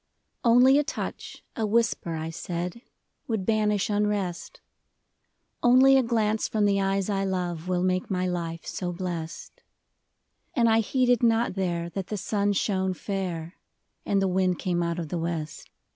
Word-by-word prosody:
NLY 250 +3 +6
a - - +2
touch, 310 - -6
a 225 - -2
whisper, 210 -6 0
I 160 +1 -4
said, 175 +5 -5 0.5
would 220 -5 -2
banish 210 -2 +1
unrest; 205 -4 -2 1.0
Only 260 +2 +6
a 265 - +6
glance 220 -3 0
from 215 -2 +1
the 200 -1 +2
eyes 195 0 0
I 195 -2 0
love 180 -3 -2
Will 180 -1 0
make 185 0 0
my 185 -2 0
life 170 -2 -3
so 180 -1 -3
blest. 175 - -6 0.9
And 235 -1 +4
I 225 0 +4
heeded 245 +1 +2
not 230 -2 +2
there 175 -3 -2
that 195 0 -4
the 210 - -3
sun 205 0 0
shone 190 -2 0
fair. 180 -4 -4 0.4
And 200 - +1
the 195 - +2
wind 185 -1 +1
came 175 -3 -1
out 170 0 -1
of 165 -3 -4
the 175 - -2
west. 165 -3 -4
195 Hz, 160 wpm, -26 LUFS, 175-220 Hz, 1.0 s, NLY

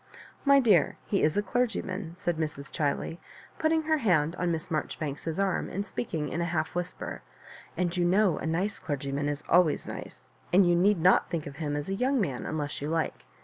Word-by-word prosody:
*' - - -24
My 280 - +8
dear, 210 - +4
he 200 - 0
is 155 +5 +2
a 205 - +2
clergyman," 195 -6 -2
said 175 -2 -2
Mrs. 150 -3 -4
Chiley, 155 +3 -1 0.4
putting 320 0 +2
her 315 0 +2
hand 170 - +2
on 175 -1 0
Miss 165 +2 -3
Maijoribauks*s 155 0 -3
arm, 195 -1 0
and 200 +2 -3
speaking 160 -10 -3
in 170 - -2
a - - +1
half 160 -2 -1
whisper; 180 0 -4 0.6
and 175 -1 0
you 175 - +1
know 185 -1 +3
a - - -3
nice 180 +6 -1
clergyman 145 -1 -2
is 145 0 -3
always 175 -3 +4
nice, - - -8 0.2
and 190 +1 +6
you 175 - +4
need 190 +2 +3
not 180 +3 +4
think 165 -3 -2
of 140 -1 -8
him 150 -3 -2
as 145 +1 -3
a 195 - -2
young 255 +6 +1
man 140 - -2
unless 150 -2 -3
you 145 - -2
like. 165 0 -2
170 Hz, 205 wpm, -28 LUFS, 155-195 Hz, 0.6 s, My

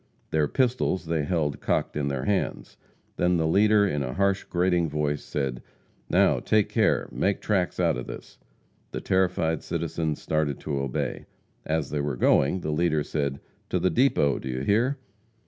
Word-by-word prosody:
Their 75 -2 +2
pistols 125 - 0
they 80 -2 -1
held 75 -4 -1
cocked - - 0
in 75 -1 -1
their 70 -2 -2
hands. 100 -2 -1 0.4
Then 90 0 +2
the 80 - +1
leader, 105 +4 +4
in 75 -6 -1
a 65 -2 -3
harsh, 100 0 +1
grating 90 -2 +1
voice, 75 -1 -1
said: 65 -4 -3 0.5
"Now, - - +4
take 110 -2 +2
care, - - +2
make 100 0 0
tracks 95 -4 0
out - - +2
of - - -6
this!" - - -10 0.5
The - - -3
terrified 90 -4 +1
citizens 80 -2 -2
started 75 -3 -1
to 70 -2 -2
obey. 70 -2 -3 0.4
As 80 -3 -1
they 75 -1 -1
were 70 -3 -2
going, 70 +9 +3
the 75 - -2
leader 75 -1 +1
said: 70 -3 -2 0.3
"To - - +1
the 95 - +1
depot, 120 - +2
do 65 - -6
you 65 0 -3
hear!" 115 - +2
80 Hz, 170 wpm, -26 LUFS, 70-95 Hz, 0.5 s, leader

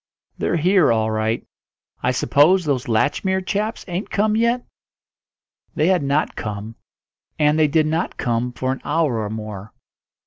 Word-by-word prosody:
"They're - - 0
here 180 -2 +4
all 110 -1 +1
right. 110 +1 -1 0.6
I - - +1
suppose 155 +8 +3
those 135 -4 -1
Latchmere 165 - 0
chaps 210 +5 -2
ain't 180 +3 -4
come 215 +1 +1
yet?" 235 +2 +1 1.1
They 155 +4 +2
had 185 -2 +3
not 140 +2 0
come, 105 0 -5 0.6
and 150 +1 +3
they 155 - +5
did 155 +1 +2
not 160 +3 -2
come 120 0 -1
for 130 +1 -2
an 130 - -4
hour 150 -7 0
or 105 -1 -3
more. 110 -1 -7
150 Hz, 150 wpm, -21 LUFS, 115-180 Hz, 1.1 s, they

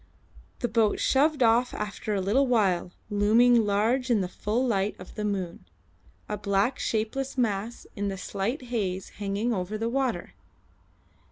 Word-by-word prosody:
The 240 - +1
boat 220 -2 +2
shoved 285 0 +3
off 235 +2 +3
after 210 0 -3
a 195 - 0
little 240 +9 +2
while, 195 -8 +2 0.2
looming 225 +3 +4
large 230 +6 +1
in 225 -4 +3
the 185 - -1
full 215 +7 -1
light 205 -4 0
of 185 - -11
the 210 - -4
moon, 190 - -3 0.6
a 210 -1 -4
black 200 +5 +1
shapeless 235 +5 -2
mass 225 -1 -1
in 205 -1 -2
the 195 -1 -3
slight 205 +8 -3
haze 190 -4 -2
hanging 205 +4 0
over 190 +1 -3
the 225 +2 -1
water. 265 -1 -1
215 Hz, 155 wpm, -27 LUFS, 200-240 Hz, 0.6 s, looming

